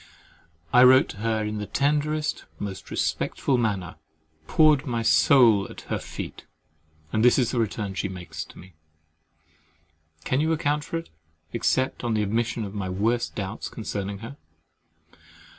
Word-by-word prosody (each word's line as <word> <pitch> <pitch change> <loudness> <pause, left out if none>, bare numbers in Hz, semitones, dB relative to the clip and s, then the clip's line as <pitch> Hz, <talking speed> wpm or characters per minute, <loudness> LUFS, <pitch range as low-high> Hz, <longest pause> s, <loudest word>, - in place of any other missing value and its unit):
I 125 - +8
wrote 130 +1 +7
to - - -8
her 110 0 -1
in 105 0 -3
the 105 - -5
tenderest, 150 +2 0
most 100 -2 -6
respectful 130 -3 0
manner, 100 -7 -2 0.5
poured 155 -2 +4
my 115 -2 -1
soul 115 -5 +5
at - - -10
her - - 0
feet, - - -8 0.7
and 110 - +2
this 125 - +6
is 125 -4 +2
the 125 - -1
return 105 -2 -2
she 100 0 -2
makes 90 -2 -7
me! 95 0 -14 1.5
Can 130 +2 +1
you 160 +1 +2
account 150 -1 0
for 165 - -4
it, 165 - -8 0.4
except 130 -1 0
on 115 -2 0
the 105 - +1
admission 110 +2 -1
of 100 - -8
my 100 -3 -3
worst 110 +6 0
doubts 100 +1 -4
concerning 100 -3 -4
her? 140 +5 -9
115 Hz, 150 wpm, -25 LUFS, 100-135 Hz, 1.5 s, I